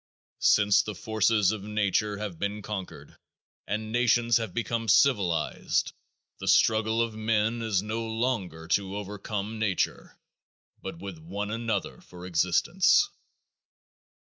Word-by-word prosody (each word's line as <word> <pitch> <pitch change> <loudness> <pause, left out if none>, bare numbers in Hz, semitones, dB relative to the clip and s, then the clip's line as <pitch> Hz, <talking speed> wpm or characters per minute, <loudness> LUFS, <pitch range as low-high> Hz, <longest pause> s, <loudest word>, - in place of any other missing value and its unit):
Since 105 -1 +4
the 105 - -6
forces 110 0 +2
of 110 -2 -4
nature 105 0 0
have 100 -5 -6
been 100 +1 -3
conquered 100 -3 -7 0.5
and 110 +1 -3
nations 120 -1 +3
have 115 -1 -3
become 115 -1 -2
civilized 100 - +2 0.5
the - - -6
struggle 110 +1 +3
of 115 -1 -4
men 110 +1 0
is 105 -4 0
no 110 +2 -3
longer 110 -9 -2
to 100 +2 0
overcome 105 +1 -5
nature 105 -5 -1 0.6
but - - -6
with 95 -2 -8
one 100 +6 -5
another 115 0 -3
for 90 0 -12
existence. 90 - +3
105 Hz, 120 wpm, -27 LUFS, 100-115 Hz, 0.6 s, Since